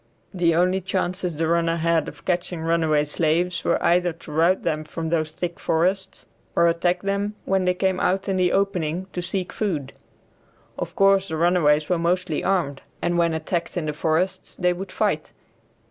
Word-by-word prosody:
The 170 -3 +2
only 185 +2 +2
chances 185 -2 -2
the 165 +2 0
hunters 165 0 +1
had 165 -2 +2
of - - -10
catching 175 -2 -1
runaway 160 -2 +2
slaves 170 +3 0
were - - +2
either 175 0 +3
to 160 -1 -12
rout 165 +5 +2
them 155 0 -1
from 160 +1 -5
those 155 -2 0
thick 175 +2 -5
forests 185 +4 -1 0.3
or 170 - +5
attack 175 +2 +1
them 200 +1 -1
when 190 -1 +1
they 180 0 +2
came 190 0 0
out 190 +2 0
in 195 - 0
the 180 -1 +2
opening 185 -3 0
to 180 - -2
seek 180 +1 -3
food. 160 -11 -2 0.8
Of - - -5
course 195 0 +4
the 160 - -3
runaways 155 -3 +3
were 180 -2 +1
mostly 175 -1 0
armed, 170 -8 0 0.2
and 175 - 0
when 170 -1 +2
attacked 165 +2 -3
in 170 - -1
the 150 - -2
forests 165 +4 -1
they 180 -1 +1
would 185 +2 -7
fight. - - -1
175 Hz, 180 wpm, -23 LUFS, 160-185 Hz, 0.8 s, or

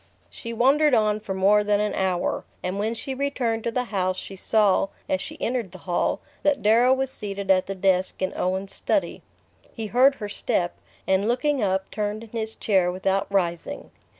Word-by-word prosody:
She 230 - -7
wandered 270 +5 +4
on 215 -1 +2
for 205 -3 -5
more 205 +2 +4
than 205 0 +2
an 210 0 0
hour, 185 -2 -1 0.2
and 185 +2 -2
when 220 +3 -1
she 265 +4 -4
returned 255 -5 -1
to 235 - 0
the 250 +2 0
house 185 -1 0
she 195 - -7
saw, 200 0 +3 0.2
as 185 - 0
she - - -8
entered 235 -6 -2
the - - -8
hall, 175 -2 0 0.2
that 290 -1 +1
Darrow 230 +4 +5
was 265 0 +1
seated 200 -4 -3
at 185 -1 +3
the 195 - -4
desk 190 -1 +1
in 185 - -1
Owen's 190 +2 -2
study. - - -1 0.5
He 225 - -6
heard 255 +6 +4
her 210 - -5
step, 175 -3 -1 0.3
and 190 +2 +2
looking 265 +3 +1
up 190 -1 0
turned 210 +1 -3
in 230 - -12
his 220 -1 -4
chair 190 -4 +2
without 190 +1 0
rising. 175 -4 -2
210 Hz, 190 wpm, -24 LUFS, 190-235 Hz, 0.5 s, Darrow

